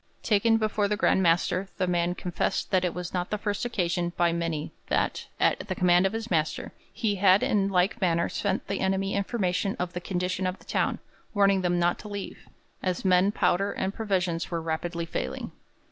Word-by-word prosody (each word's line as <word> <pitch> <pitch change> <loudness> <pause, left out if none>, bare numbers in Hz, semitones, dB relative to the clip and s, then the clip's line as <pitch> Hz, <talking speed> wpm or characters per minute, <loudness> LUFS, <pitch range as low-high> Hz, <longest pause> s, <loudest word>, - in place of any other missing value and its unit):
Taken 225 +1 +3
before 215 -2 +1
the 210 +1 -1
Grand 190 - +3
Master 180 +2 +2
the 185 - +1
man 175 0 0
confessed 180 -2 -2
that 185 -2 +3
it 180 -2 -1
was 180 -1 -5
not 180 -1 -1
the 210 - -1
first 205 +1 -2
occasion 175 -6 -1
by 170 -1 +3
many 165 -3 -2 0.2
that, - - 0
at - - +3
the 190 - -2
command 180 +1 +4
of 190 - -5
his 225 -1 -4
master, 160 -2 -1 0.2
he 210 -4 -1
had 190 0 +5
in 200 -2 +2
like 190 +3 +1
manner 170 -2 +2
sent 200 -1 -2
the 195 - -2
enemy 195 +1 0
information 195 -2 0
of 180 0 -3
the 175 - -4
condition 185 +1 -1
of 185 +1 -3
the - - -20
town, - - 0 0.4
warning 200 -1 +4
them 175 -1 +1
not 175 0 +1
to - - -9
leave, 205 -1 -7 0.3
as 185 0 -2
men, 185 +1 +4
powder, 200 -1 +1
and 190 +1 -2
provisions 180 -6 -1
were 170 - -2
rapidly 165 +1 -3
failing. 65 - -4
185 Hz, 195 wpm, -27 LUFS, 175-200 Hz, 0.4 s, had